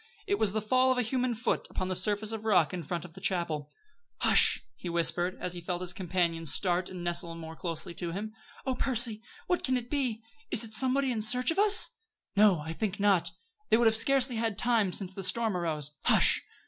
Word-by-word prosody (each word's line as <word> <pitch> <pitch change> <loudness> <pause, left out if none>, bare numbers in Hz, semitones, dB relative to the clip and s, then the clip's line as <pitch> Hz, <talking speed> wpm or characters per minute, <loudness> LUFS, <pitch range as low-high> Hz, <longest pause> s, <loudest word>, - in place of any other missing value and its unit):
It 405 - 0
was 205 - +3
the 215 0 -2
fall 255 +4 +3
of 255 - +1
a 250 - +2
human 250 +1 -1
foot 225 - -1
upon 185 - -3
the 185 - -2
surface 210 +2 0
of 220 -1 -5
rock 185 -7 +3
in 180 - -3
front 170 +2 -4
of 165 - -12
the - - -12
chapel! 160 -5 -1 0.5
"Hush!" - - +4
he 180 - -7
whispered, 175 +1 0
as 180 - -3
he 175 - -6
felt 175 +1 -3
his 180 -1 -3
companion 170 -3 -1
start 180 +3 0
and 180 -2 -7
nestle 170 -1 -2
more 160 -1 -8
closely 170 0 -5
to 170 -1 -5
him. 210 +5 -5 0.3
"Oh, 265 - 0
Percy! 240 -4 +2 0.2
What 360 - 0
can 255 -1 +1
it 245 -1 -7
be? 250 -6 -1 0.3
Is 225 - 0
it 220 -1 -7
somebody 265 +2 +2
in 225 -3 -2
search 250 +6 +4
of 345 - -1
us?" 425 +2 +5 0.4
"No; 200 -6 +5
I 160 +2 -5
think 205 +2 -3
not. 200 -4 +3 0.4
They 220 - +5
would 235 - +2
have 220 0 +5
scarcely 255 +1 +2
had 225 -3 -1
time 225 -5 +2
since 190 0 -5
the 195 - -6
storm 215 +2 0
arose. 155 -4 -3
Hush! - - +3
205 Hz, 220 wpm, -29 LUFS, 175-240 Hz, 0.5 s, us